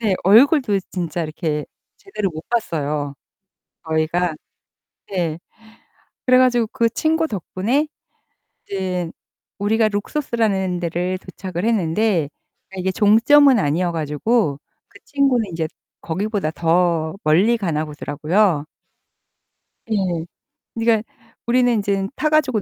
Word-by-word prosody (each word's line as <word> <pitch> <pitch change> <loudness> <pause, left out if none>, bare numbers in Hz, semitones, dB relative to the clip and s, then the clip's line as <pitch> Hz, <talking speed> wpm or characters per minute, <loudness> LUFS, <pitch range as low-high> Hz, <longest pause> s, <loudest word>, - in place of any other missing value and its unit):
네 210 -5 +1
얼굴도 230 - +5
진짜 175 -2 -2
이렇게 155 -1 -3 0.3
제대로 210 - -4
못 160 0 -8
봤어요, 150 -10 -2 0.7
저희가. 160 +1 0 0.8
네. 170 -5 -1 0.9
그래 255 0 +5
가지고 245 -3 +3
그 235 -3 +2
친구 320 +6 0
덕분에 220 - -1 0.8
이제 180 -3 -3 0.5
우리가 215 +2 +2
룩소스라는 205 -5 -1
데를 180 +2 -2
도착을 185 -1 -6
했는데 200 -5 +1 0.5
이게 185 0 -1
종점은 240 +7 +5
아니어 175 +1 +1
가지고 155 - 0 0.3
그 200 - -18
친구는 270 -5 +1
이제 165 -1 -1 0.3
거기보다 195 0 -2
더 165 0 +1
멀리 185 +10 +4
가나 160 -7 -1
보더라고요. 150 +3 0 1.3
예. - - 0 0.8
그니까 225 -1 +2 0.4
우리는 245 +1 +3
인젠 200 -3 0
타 305 - 0
가지고 270 -8 +2
195 Hz, 245 characters per minute, -20 LUFS, 165-230 Hz, 1.3 s, 얼굴도